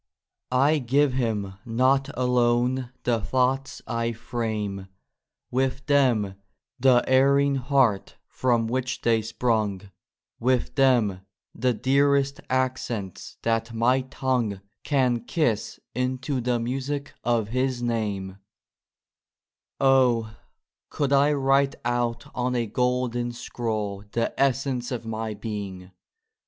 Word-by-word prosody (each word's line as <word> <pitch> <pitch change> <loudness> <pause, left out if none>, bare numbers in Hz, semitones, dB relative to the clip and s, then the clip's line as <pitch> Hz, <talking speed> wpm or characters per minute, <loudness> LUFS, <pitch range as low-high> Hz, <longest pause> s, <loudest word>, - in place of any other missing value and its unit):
I 140 +5 +3
give 135 +2 +2
Him 110 -6 -1
not 130 +4 +2
alone 125 0 +2
the 115 -3 +1
thoughts 130 +4 0
I 115 -1 -1
frame, 110 -4 -4 0.6
With 130 +1 -1
them, 120 -9 +2 0.4
the 125 -1 +5
erring 140 +1 +4
heart 130 -6 +1
from 120 -3 +1
which 130 +3 -2
they 115 -1 +2
sprung, 105 -4 -1 0.5
With 125 0 +1
them, 120 -9 +3 0.3
the 125 +1 0
dearest 140 +2 +2
accents 125 -7 -2
that 115 0 0
my 125 +3 +3
tongue 125 -6 -2 0.2
Can 130 -4 +2
kiss 120 -10 -1
into 130 +2 -1
the 120 0 0
music 135 +4 -3
of 115 -3 +1
His 130 0 -1
name 105 -5 -1
1 95 - -14 1.4
Oh! 125 -5 +3 0.5
could 140 -1 -1
I 140 +2 +5
write 135 -1 +2
out 120 -1 -1
on 125 0 -1
a 120 -1 +1
golden 120 +1 -1
scroll 110 -4 -4
The 115 0 0
essence 135 -2 +1
of 120 -2 -4
my 110 -1 -4
being 100 -4 -6
125 Hz, 110 wpm, -25 LUFS, 115-130 Hz, 1.4 s, the